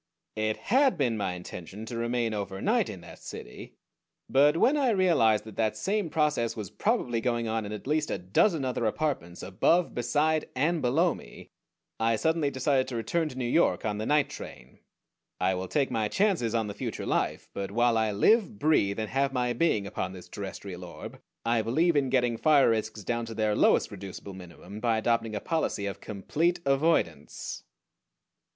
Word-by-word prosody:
It 110 0 -1
had 265 -3 +2
been 125 -6 +1
my 100 -4 -2
intention 90 +3 -8
to 115 - -6
remain 115 -1 -1
overnight 100 -2 0
in - - -8
that - - -12
city; - - -9 0.5
but 145 +3 +4
when 265 - +4
I 275 -4 +2
realized 170 - +3
that 110 -2 -12
that 110 -1 0
same 195 - -1
process 150 -7 +1
was 105 -4 -6
probably 120 -2 0
going 120 -1 0
on 110 -1 -2
in - - -7
at 105 - -6
least 150 +2 0
a - - -1
dozen 135 - +2
other 125 -3 0
apartments, 110 - -2
above, 165 - +2
beside, 150 +6 +1
and 155 +5 +1
below 160 +8 +2
me, - - -13 0.5
I 115 0 +2
suddenly 160 +4 +1
decided 130 0 +1
to 125 - -5
return 155 +9 -1
to 130 - -10
New 130 - -2
York 140 +2 +2
on 105 -1 -1
the 110 - -3
night 145 -1 +2
train. 65 - -10 0.6
I 95 +1 +2
will 95 0 -3
take 140 +6 0
my 110 -1 0
chances 165 - +1
on 115 -1 +1
the 105 - -5
future 105 - -5
life; - - -1
but 100 -1 -4
while 120 +3 +2
I 110 -1 +2
live, 215 - +3
breathe, 145 - +2
and 110 -1 -3
have 135 +1 +1
my 125 -2 0
being 120 -10 +1
upon 95 -1 -4
this 90 -2 -11
terrestrial 95 -2 -7
orb 85 -1 -9 0.2
I 115 -1 +2
believe 155 +10 +2
in 140 -2 +2
getting 125 -3 +1
fire 145 -3 +5
risks 110 -1 -2
down 115 +3 -2
to 115 - -7
their 110 -1 +1
lowest - - +3
reducible 100 0 -8
minimum 95 +3 -10
by 115 -1 +1
adopting 115 -1 0
a - - -1
policy 155 -8 -1
of 100 - -5
complete 155 - -1
avoidance. 135 - 0
115 Hz, 185 wpm, -28 LUFS, 105-150 Hz, 0.6 s, fire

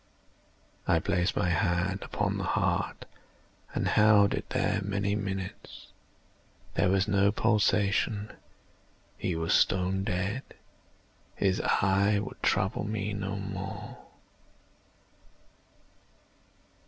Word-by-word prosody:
I - - +4
placed 90 +2 0
my 90 - +1
hand 90 +2 0
upon - - -2
the - - -2
heart - - -1 0.7
and - - 0
held 105 -1 +5
it - - -4
there 105 0 0
many 100 0 -1
minutes. 95 -2 -5 0.8
There - - +2
was 95 +1 +2
no 100 -1 +3
pulsation. 105 -1 +1 0.8
He 90 - -2
was 80 0 0
stone 95 +1 +2
dead. 100 +4 -2 0.9
His 95 -2 +1
eye 100 +2 +2
would 100 - -5
trouble 95 +1 +1
me 105 -1 -3
no 100 0 -3
more. 95 -1 -6
100 Hz, 100 wpm, -29 LUFS, 95-105 Hz, 0.9 s, held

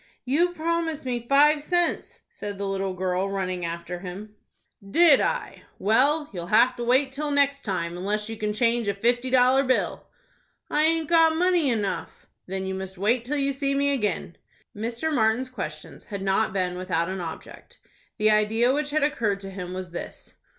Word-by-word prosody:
"You 335 +8 +2
promised 330 -2 -2
me 240 -2 -3
five 295 +2 +5
cents," 350 +3 -1
said 205 -1 -6
the 200 0 -3
little 195 -1 -2
girl, 185 +1 -1
running 185 -2 -3
after 170 +1 -5
him. 195 +3 -8 0.6
"Did 325 +4 +6
I? - - -2 0.2
Well, 280 +9 +2
you'll 175 -2 -5
have 230 +5 +4
to 240 - -3
wait 260 +3 +2
till 295 +2 -3
next 280 -1 +2
time, 170 -4 -3
unless 210 +4 -2
you 225 - -5
can 210 -1 -2
change 230 +1 +1
a 200 - 0
fifty 240 +4 +1
dollar 255 +1 +4
bill." 255 -1 -1 0.6
"I 300 +1 +3
aint 325 -1 +1
got 325 -1 +5
money 350 -3 +2
enough." 210 -5 -3 0.2
"Then 190 +1 -3
you 190 - -3
must 190 0 -6
wait 225 +5 +1
till 295 +4 -1
you 275 0 0
see 275 0 -1
me 280 0 +2
again." 210 -8 -2 0.4
Mr. 235 +9 -2
Martin's 240 +1 +1
questions 155 -10 -7
had 200 -2 -6
not 195 +2 +1
been 180 -2 -2
without 170 -2 -1
an 190 0 -4
object. 165 -2 -9 0.4
The 215 -1 +3
idea 220 +4 +3
which 295 +1 -1
had 305 0 +1
occurred 230 -9 0
to 195 -1 -7
him 180 -2 -6
was 185 -1 -6
this. 175 - -8
225 Hz, 180 wpm, -25 LUFS, 190-280 Hz, 0.6 s, Did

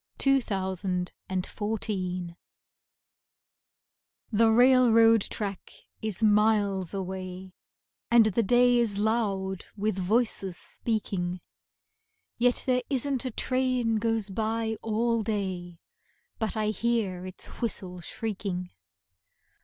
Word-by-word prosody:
Edna 275 -1 +4
St. - - -15
Vincent 190 -2 -2 0.2
Millay 205 +4 -2
Travel 185 -4 -3 2.0
THE 225 +1 +4
railroad 230 -2 +6
track 200 -2 -4 0.3
is 220 0 -2
miles 205 -3 +3
away, 185 -1 -6 0.6
And 235 -1 +6
the 215 +2 +2
day 245 +3 +4
is 220 -4 0
loud 200 -4 -1
with 205 -1 -1
voices 195 -2 0
speaking, 185 -5 -3 1.0
Yet 245 0 +2
there 250 -1 +2
isn't 270 -1 -1
a - - -1
train 255 -2 0
goes 225 -2 0
by 220 +2 -1
all 230 +1 0
day 190 -5 -3 0.6
But 220 0 -2
I 215 -1 +1
hear 215 -6 -1
its 185 - -6 0.2
whistle 185 -6 -2
shrieking. 190 -2 -4
215 Hz, 105 wpm, -28 LUFS, 190-230 Hz, 2.0 s, railroad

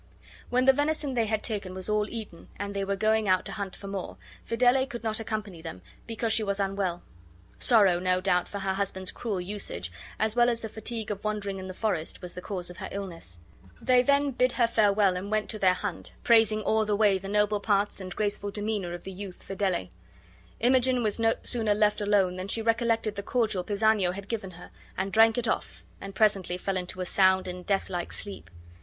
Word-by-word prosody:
When 255 +1 +2
the 270 - +7
venison 290 0 0
they 230 -3 +1
had 215 0 -1
taken 200 -5 -3
was 185 -1 -3
all 210 0 +1
eaten 215 -7 -8
and 200 0 -4
they 200 - -1
were 200 0 -1
going 215 +1 +2
out 185 0 +3
to - - -3
hunt 200 -3 -5
for - - -12
more, 195 -2 -5 0.3
Fidele 250 +3 +3
could 240 -2 -7
not 220 -1 0
accompany 215 -6 -4
them 160 - -8 0.2
because 225 0 0
she 220 - +2
was 200 -1 -1
unwell. 195 -3 -1 0.6
Sorrow, 200 -7 +5
no 185 0 +1
doubt, 180 -1 +1
for 205 - -5
her 195 -1 -1
husband's 190 -1 -2
cruel 210 -6 -3
usage, 180 - -4 0.3
as 220 +1 +1
well 240 0 +5
as 235 -1 -1
the 220 - -5
fatigue 220 0 -3
of 200 -1 -5
wandering 205 -2 -2
in 185 - -7
the 185 - -6
forest, 195 -8 -1
was 180 -1 -6
the 180 - -7
cause 180 -2 -4
of 180 - -12
her - - -6
illness. 170 - -6 0.4
They 250 -1 +4
then 280 +2 +3
bid 250 0 +2
her 240 - +3
farewell, 205 -4 +3
and 185 +3 -4
went 215 -1 0
to 215 - -5
their 185 -2 +4
hunt, 185 -2 -5
praising 220 -2 +5
all 220 +1 +2
the 210 -1 0
way 200 -2 +3
the 195 - -8
noble 210 0 +2
parts 200 -1 +1
and 185 -1 -7
graceful 205 -1 -1
demeanor 205 -4 -3
of 175 - -10
the 190 - -6
youth 190 -1 -8
Fidele. 190 - -1 0.7
Imogen 255 0 +3
was 215 0 0
no 225 0 +3
sooner 220 -4 0
left 210 0 +2
alone 200 -3 +2
than 185 +1 -5
she 225 +3 -1
recollected 230 -2 +1
the - - -1
cordial 215 -4 0
Pisanio 205 -2 +2
had 200 +1 -8
given 215 -4 -3
her, 180 - -12 0.3
and 195 +1 -2
drank 225 +1 +6
it 245 - 0
off, - - -3 0.2
and 195 0 -8
presently 195 -5 +2
fell 195 +1 -2
into 185 +1 -4
a - - -1
sound 190 0 +3
and 180 0 -7
deathlike 190 -3 -1
sleep. 200 - -6
205 Hz, 215 wpm, -28 LUFS, 190-220 Hz, 0.7 s, the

